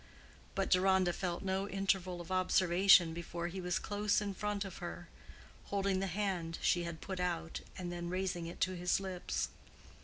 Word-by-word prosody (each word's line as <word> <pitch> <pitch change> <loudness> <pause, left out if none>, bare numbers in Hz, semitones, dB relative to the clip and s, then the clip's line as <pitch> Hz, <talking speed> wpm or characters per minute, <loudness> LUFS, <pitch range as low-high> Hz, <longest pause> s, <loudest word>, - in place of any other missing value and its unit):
But 195 - 0
Deronda 185 -1 +4
felt 175 0 -3
no 190 +1 -1
interval 190 -2 0
of 175 - -9
observation 185 -1 +5
before 170 0 -4
he 185 +2 -5
was 180 0 0
close 205 0 +1
in 205 -2 -3
front 205 0 -2
of 195 - -7
her, 175 0 -6 0.6
holding 195 -1 0
the 195 - -1
hand 180 -3 -2
she 175 -1 +2
had 170 -1 -6
put 190 -2 -5
out 170 -2 -2 0.2
and 180 -1 -4
then 175 0 -4
raising 180 -2 -2
it 170 - -8
to 185 0 +2
his 180 +1 +1
lips. 190 -2 -2
185 Hz, 175 wpm, -34 LUFS, 175-195 Hz, 0.6 s, observation